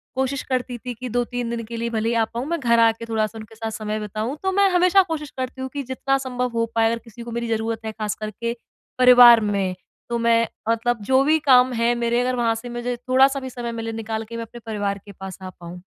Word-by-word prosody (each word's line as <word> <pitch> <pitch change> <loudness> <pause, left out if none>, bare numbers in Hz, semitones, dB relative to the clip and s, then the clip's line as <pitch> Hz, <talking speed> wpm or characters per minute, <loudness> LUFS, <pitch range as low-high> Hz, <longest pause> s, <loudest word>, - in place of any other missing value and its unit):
कोशिश 265 +1 -1
करती 255 -1 -1
थी 250 +1 -6
कि 250 +2 -7
2-3 245 0 -2
दिन 235 0 -3
के 230 +1 -7
लिए 235 +1 -2
भले 225 0 0
ही - - 0
आ 230 - +3
पाऊँ, 235 +3 -5
मैं 340 +1 -1
घर 235 -3 +3
आ 230 0 +6
के 225 +1 -9
थोड़ा-सा 220 -1 -1
उनके 220 0 -11
साथ 225 0 -4
समय 215 0 -3
बिताऊँ, 215 +5 -4
तो 380 - +1
मैं 400 +1 +4
हमेशा 365 +2 +5
कोशिश 300 -2 -3
करती 260 0 -4
हूँ 260 - -4
कि 285 -1 -3
जितना 270 +1 +1
संभव 250 -2 -2
हो 230 0 +1
पाए 225 0 +4
अगर 230 - -2
किसी 230 0 -13
को 235 - -8
मेरी 235 0 -3
जरूरत 225 0 -1
है 220 - -3
ख़ास 215 -1 -3
करके 230 +2 -4 0.4
परिवार 245 -2 +9
में, 190 -2 -1 0.3
तो 235 - 0
मैं 230 0 +3 0.2
मतलब 230 0 0
जो 260 +1 +5
भी 310 +3 +4
काम 250 0 +6
हैं 235 0 +2
मेरे, 235 0 +1
अगर 255 0 0
वहाँ 230 -2 +1
से 235 +2 -7
मुझे 240 +1 -3
थोड़ा-सा 260 +3 +3
भी 260 -1 -6
समय 240 -1 -5
मिले 225 -1 -4
निकाल 220 0 -3
के 230 - -7
मैं 230 - -4
अपने 240 +1 -11
परिवार 205 -3 -2
के 205 - -10
पास 190 -1 -9
आ 185 - -6
पाऊँ। 175 0 -11
235 Hz, 250 wpm, -22 LUFS, 225-250 Hz, 0.4 s, परिवार